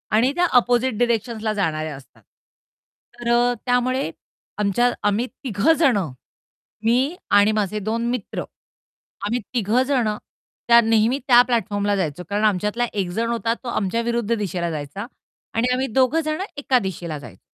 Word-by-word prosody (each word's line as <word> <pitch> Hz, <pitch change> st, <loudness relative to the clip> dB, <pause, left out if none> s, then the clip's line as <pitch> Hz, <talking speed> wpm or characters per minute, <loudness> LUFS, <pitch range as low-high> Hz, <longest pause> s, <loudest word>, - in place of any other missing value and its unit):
आणि 240 Hz, +5 st, +4 dB
त्या 355 Hz, -, +3 dB
अपोझिट 245 Hz, -1 st, 0 dB
डायरेक्शन्सला 230 Hz, -2 st, 0 dB
जाणाऱ्या 155 Hz, -6 st, -2 dB
असतात. 130 Hz, -4 st, -16 dB, 1.0 s
तर 240 Hz, 0 st, -3 dB
अ, 240 Hz, +1 st, +3 dB
त्यामुळे 255 Hz, +2 st, +1 dB, 0.5 s
आमच्या 210 Hz, +4 st, +2 dB
आम्ही 205 Hz, +3 st, +1 dB
3 240 Hz, +2 st, +1 dB
जण, 270 Hz, -9 st, +4 dB, 0.9 s
मी 255 Hz, +8 st, +2 dB, 0.2 s
आणि 205 Hz, +1 st, +5 dB
माझे 215 Hz, -1 st, -1 dB
2 225 Hz, +3 st, -2 dB
मित्र. 245 Hz, -5 st, -3 dB, 0.8 s
आम्ही 235 Hz, +4 st, 0 dB
3 235 Hz, +1 st, +2 dB
जण 260 Hz, -4 st, +1 dB, 0.6 s
त्या 235 Hz, 0 st, +8 dB
नेहमी 225 Hz, +3 st, +2 dB
त्या 245 Hz, -2 st, +8 dB
प्लॅटफॉर्मला 205 Hz, -4 st, 0 dB
जायचो. 180 Hz, -3 st, -2 dB
कारण 205 Hz, +1 st, -1 dB
आमच्यातला 210 Hz, +4 st, +1 dB
एक 195 Hz, -4 st, -1 dB
जण 230 Hz, 0 st, 0 dB
होता 230 Hz, -1 st, 0 dB
तो -, -, -7 dB
आमच्या 215 Hz, 0 st, -1 dB
विरुद्ध 235 Hz, -1 st, -1 dB
दिशेला 180 Hz, -5 st, -2 dB
जायचा 150 Hz, +6 st, -5 dB, 0.5 s
आणि 230 Hz, +2 st, +1 dB
आम्ही 260 Hz, +1 st, 0 dB
2 260 Hz, +6 st, +2 dB
जण 310 Hz, +3 st, -2 dB, 0.2 s
एका 270 Hz, -3 st, +2 dB
दिशेला 175 Hz, -6 st, -5 dB
जायचो. 115 Hz, -9 st, -12 dB
225 Hz, 145 wpm, -22 LUFS, 200-245 Hz, 1.0 s, त्या